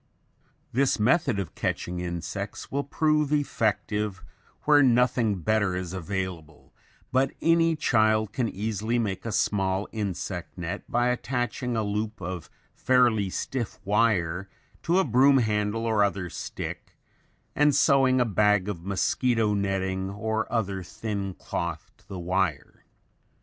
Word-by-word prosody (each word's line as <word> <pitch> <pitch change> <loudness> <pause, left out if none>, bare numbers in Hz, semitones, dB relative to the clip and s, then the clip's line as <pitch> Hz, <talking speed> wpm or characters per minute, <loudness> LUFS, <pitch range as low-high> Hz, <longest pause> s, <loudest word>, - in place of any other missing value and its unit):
] - - -40 0.3
This 130 -1 +2
method 130 - +2
of 95 -5 -4
catching 90 0 -2
insects 90 +4 -5
will 140 +1 0
prove 150 0 +1
effective 105 - -1 0.4
where 145 -1 +6
nothing 120 -6 +3
better 105 -1 +1
is 90 -1 -4
available, 90 -4 -5 0.4
but 130 +1 +2
any 165 0 +3
child 110 -7 +2
can 120 -3 0
easily 110 +3 -2
make 105 -2 -2
a - - -2
small 95 -1 0
insect 95 -5 -4
net 90 +3 -5
by 120 +1 +2
attaching 125 -1 -2
a 110 - +1
loop 105 +1 -3
of 90 -2 -6 0.2
fairly 120 -6 +3
stiff 115 0 -4
wire 95 -4 +1 0.3
to 175 +2 +1
a 190 - +4
broom 135 +2 +5
handle 110 -1 0
or 110 -2 +3
other 95 -4 -1
stick - - -7 0.6
and 145 -1 +4
sewing 135 -2 +4
a 125 - +3
bag 105 -2 +2
of 90 -5 -4
mosquito 110 +3 +1
netting 95 -1 -1
or 110 +2 -2
other 100 -5 -1
thin 100 +1 -4
cloth 85 -2 -4
to 105 - -28
the 100 -2 -7
wire. 90 -4 -2
105 Hz, 135 wpm, -26 LUFS, 95-120 Hz, 0.6 s, where